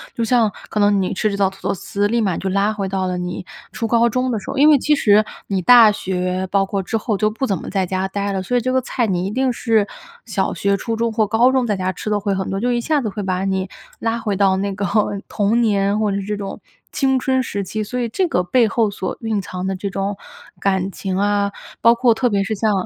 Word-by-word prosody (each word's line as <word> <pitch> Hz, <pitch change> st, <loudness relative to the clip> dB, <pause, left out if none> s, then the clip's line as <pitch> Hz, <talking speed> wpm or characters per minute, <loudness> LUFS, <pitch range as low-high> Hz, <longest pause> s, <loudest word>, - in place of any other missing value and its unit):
就 230 Hz, -, -1 dB
像 230 Hz, -2 st, +3 dB, 0.2 s
可 215 Hz, -, -2 dB
能 205 Hz, -1 st, +3 dB
你 185 Hz, -, -1 dB
吃 215 Hz, +3 st, 0 dB
这 200 Hz, -, -3 dB
道 195 Hz, -1 st, +2 dB
土 195 Hz, -, -16 dB
豆 -, -, +1 dB
丝， 200 Hz, +2 st, -2 dB
立 235 Hz, +2 st, +1 dB
马 190 Hz, -5 st, 0 dB
就 190 Hz, -, -3 dB
拉 200 Hz, +2 st, +1 dB
回 200 Hz, -3 st, -3 dB
到 190 Hz, -1 st, -1 dB
了 180 Hz, 0 st, -2 dB
你 180 Hz, 0 st, -5 dB, 0.3 s
初 230 Hz, -, -3 dB
高 235 Hz, +1 st, +3 dB
中 255 Hz, +2 st, 0 dB
的 225 Hz, -, -1 dB
时 -, -, -10 dB
候。 -, -, -4 dB
因 295 Hz, +3 st, +6 dB
为 300 Hz, -, +7 dB
其 300 Hz, +3 st, +2 dB
实 215 Hz, -5 st, +4 dB, 0.2 s
你 195 Hz, -2 st, -1 dB
大 230 Hz, +2 st, +8 dB
学， 185 Hz, -1 st, -2 dB
包 195 Hz, -1 st, +2 dB
括 195 Hz, 0 st, -2 dB
之 190 Hz, -, -4 dB
后 220 Hz, -1 st, -1 dB
就 215 Hz, +1 st, +2 dB
不 220 Hz, +5 st, -3 dB
怎 195 Hz, -7 st, 0 dB
么 -, -, -7 dB
在 195 Hz, -2 st, 0 dB
家 185 Hz, +1 st, -2 dB
呆 200 Hz, +1 st, -3 dB
了， 190 Hz, -1 st, -2 dB
所 245 Hz, +7 st, -2 dB
以 245 Hz, -, +3 dB
这 255 Hz, +2 st, -1 dB
个 260 Hz, -, +3 dB
菜 250 Hz, -1 st, -1 dB
你 185 Hz, -3 st, -1 dB
一 -, -, -4 dB
定 260 Hz, +3 st, +1 dB
是 225 Hz, -3 st, +1 dB, 0.4 s
小 -, -, -1 dB
学、 200 Hz, 0 st, 0 dB
初 225 Hz, +3 st, -3 dB
中 230 Hz, +1 st, 0 dB
或 220 Hz, -1 st, +1 dB
高 230 Hz, +5 st, +4 dB
中 260 Hz, -2 st, +1 dB
在 210 Hz, -, +1 dB
家 185 Hz, -1 st, -1 dB
吃 185 Hz, -, -6 dB
得 210 Hz, -, +2 dB
会 200 Hz, 0 st, 0 dB
很 190 Hz, 0 st, -2 dB
多， 195 Hz, -, -2 dB
就 245 Hz, +5 st, 0 dB
一 240 Hz, -, +1 dB
下 295 Hz, +4 st, +1 dB
子 220 Hz, -, -2 dB
会 205 Hz, +1 st, -5 dB
把 185 Hz, -1 st, -1 dB
你 190 Hz, -1 st, -1 dB, 0.3 s
拉 230 Hz, 0 st, -1 dB
回 210 Hz, -4 st, -2 dB
到 195 Hz, -2 st, +3 dB
那 195 Hz, +1 st, -2 dB
个 200 Hz, +1 st, -3 dB, 0.4 s
童 215 Hz, +3 st, +1 dB
年， 205 Hz, -2 st, +1 dB
或 215 Hz, -, +1 dB
者 -, -, -1 dB
这 210 Hz, 0 st, -3 dB
种 195 Hz, -1 st, -6 dB, 0.3 s
青 265 Hz, -1 st, +2 dB
春 260 Hz, 0 st, +1 dB
时 200 Hz, -4 st, -3 dB
期。 215 Hz, +3 st, -4 dB
所 250 Hz, +4 st, -4 dB
以 240 Hz, -, 0 dB
这 365 Hz, -, 0 dB
个 180 Hz, -, 0 dB
背 235 Hz, +5 st, +3 dB
后 220 Hz, 0 st, +1 dB
所 195 Hz, -2 st, -4 dB
蕴 220 Hz, -3 st, -1 dB
藏 185 Hz, 0 st, -6 dB
的 190 Hz, -, -1 dB
这 195 Hz, +2 st, -4 dB
种， 195 Hz, +1 st, -3 dB, 0.4 s
感 190 Hz, -1 st, 0 dB
情 190 Hz, -1 st, -4 dB
啊 205 Hz, 0 st, +1 dB, 0.3 s
包 230 Hz, -, +6 dB
括 240 Hz, -1 st, +4 dB
特 245 Hz, +3 st, +1 dB
别 200 Hz, -2 st, +1 dB
是 210 Hz, +3 st, -2 dB
像 215 Hz, +1 st, +1 dB
205 Hz, 290 characters per minute, -20 LUFS, 195-230 Hz, 0.4 s, 大